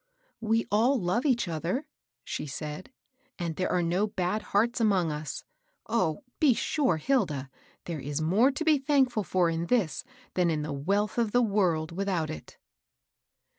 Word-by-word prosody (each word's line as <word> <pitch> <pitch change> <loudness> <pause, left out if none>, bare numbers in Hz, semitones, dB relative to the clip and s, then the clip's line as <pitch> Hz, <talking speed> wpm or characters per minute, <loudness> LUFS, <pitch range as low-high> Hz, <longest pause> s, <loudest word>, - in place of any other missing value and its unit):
"We 225 0 +1
all 240 +6 +3
love 225 +9 0
each 240 -7 +2
other," 170 - -2 0.4
she - - -4
said; 150 - -6 0.5
"and 170 -3 -3
there 185 - -1
are 180 -1 +2
no 180 +5 +1
bad 195 +1 -1
hearts 230 +4 +1
among 190 -7 +2
us. 150 -1 -5 0.4
Oh 185 - 0
I - - -36
be 290 -5 +5
sure, 265 - +1
Hilda, 155 - 0 0.3
there 165 -3 -4
is 145 +2 -3
more 190 - +4
to 285 +4 -3
be 310 -3 +4
thankfiil 265 -6 +2
for 180 +1 +2
in 165 +1 -2
this, 215 -9 +1 0.3
than 180 -2 +2
in 155 -2 -1
the 150 -1 -4
wealth 200 +11 0
of 225 -3 0
the 245 0 +4
world 180 -7 +1
without 180 -3 -1
it." 75 - -10
185 Hz, 170 wpm, -28 LUFS, 160-235 Hz, 0.5 s, be